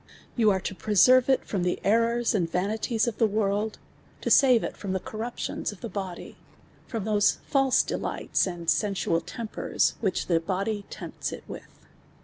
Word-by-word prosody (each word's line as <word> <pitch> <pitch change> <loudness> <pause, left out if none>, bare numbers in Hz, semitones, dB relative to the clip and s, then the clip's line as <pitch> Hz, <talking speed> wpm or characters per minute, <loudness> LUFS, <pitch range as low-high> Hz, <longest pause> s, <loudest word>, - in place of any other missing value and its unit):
\ - - -14
Ou 220 -2 +5
are 195 - +3
'.o - - -2
|)reserve 250 +5 +6
it 265 - +2
iVom 195 - -2
the 180 0 0
errors 230 +3 +2
and 175 -6 0
vanities 215 +6 0
of 235 - -3
the 225 - +4
world, 210 +1 -1 0.5
(.o - - +1
save 255 -5 +6
it - - -4
from 195 -2 -4
the 190 - 0
corru[)tions 225 +5 -4
(d' 205 - -8
the 235 - -6
body, 190 -2 -6 0.5
from 225 -5 -4
those 210 -1 +3
false 270 -2 +3
dcli^lds, - - -1
and 175 -2 -6
sensual 195 -4 +1
lempers, 230 -3 -1
whi<h 195 -5 0
(he 170 - +3
body 200 +4 -2
(emp(s - - -5
it - - -8
with. - - -11
210 Hz, 175 wpm, -26 LUFS, 190-230 Hz, 0.5 s, |)reserve